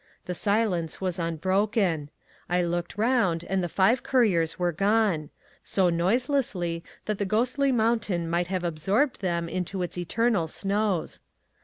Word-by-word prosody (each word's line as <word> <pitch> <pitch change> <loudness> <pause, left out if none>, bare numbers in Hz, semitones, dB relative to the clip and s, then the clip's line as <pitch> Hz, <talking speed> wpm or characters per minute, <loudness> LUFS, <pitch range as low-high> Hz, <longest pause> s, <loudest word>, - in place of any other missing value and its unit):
The 180 - -3
silence 200 -4 0
was 185 -1 -2
unbroken. 180 -1 0 0.4
I 180 0 +2
looked 175 +2 -3
round, 215 -8 +2
and 190 +1 -1
the 175 - -2
five 200 +9 +3
couriers 185 -11 +2
were 175 -1 +1
gone: 195 -4 +1 0.3
so 185 -3 +2
noiselessly 185 -3 0 0.2
that 215 -2 -2
the - - +1
ghostly 250 +7 +1
mountain 220 -7 +1
might 170 +1 0
have 185 -1 -2
absorbed 195 - 0
them 170 -3 -1
into 180 +2 -3
its 175 0 -5
eternal 200 0 +1
snows. 200 +1 -1
185 Hz, 140 wpm, -26 LUFS, 170-215 Hz, 0.4 s, five